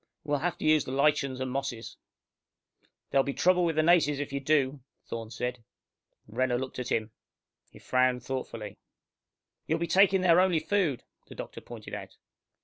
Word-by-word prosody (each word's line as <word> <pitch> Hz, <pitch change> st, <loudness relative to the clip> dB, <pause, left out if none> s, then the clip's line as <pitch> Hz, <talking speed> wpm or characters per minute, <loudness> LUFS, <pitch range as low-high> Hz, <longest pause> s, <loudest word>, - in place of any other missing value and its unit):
We'll 145 Hz, -1 st, 0 dB
have 175 Hz, +2 st, -2 dB
to -, -, -5 dB
use 155 Hz, -1 st, +4 dB
the -, -, -6 dB
lichens 140 Hz, -1 st, +1 dB
and 130 Hz, 0 st, -2 dB
the -, -, -5 dB
mosses." 135 Hz, -4 st, -4 dB, 1.2 s
"There'll 135 Hz, -, +4 dB
be 140 Hz, -, -3 dB
trouble 180 Hz, 0 st, +3 dB
with 165 Hz, -2 st, +1 dB
the 155 Hz, -, +3 dB
natives 155 Hz, -4 st, +4 dB
if 145 Hz, 0 st, -4 dB
you 140 Hz, -, -1 dB
do," 140 Hz, -1 st, +1 dB, 0.3 s
Thorne 115 Hz, -1 st, -6 dB
said. 125 Hz, +1 st, -4 dB, 0.6 s
Renner 120 Hz, +3 st, 0 dB
looked 130 Hz, 0 st, -5 dB
at 125 Hz, -, -4 dB
him. 110 Hz, -1 st, 0 dB, 0.6 s
He -, -, -16 dB
frowned 125 Hz, -1 st, +1 dB
thoughtfully. 115 Hz, -6 st, -5 dB, 0.9 s
"You'll 160 Hz, -, +1 dB
be 170 Hz, -, -1 dB
taking 190 Hz, +2 st, +4 dB
their 175 Hz, -1 st, +5 dB
only 185 Hz, -2 st, +3 dB
food," 160 Hz, -, 0 dB, 0.2 s
the -, -, -11 dB
doctor -, -, -8 dB
pointed -, -, -10 dB
out. -, -, -7 dB
140 Hz, 175 wpm, -29 LUFS, 125-165 Hz, 1.2 s, their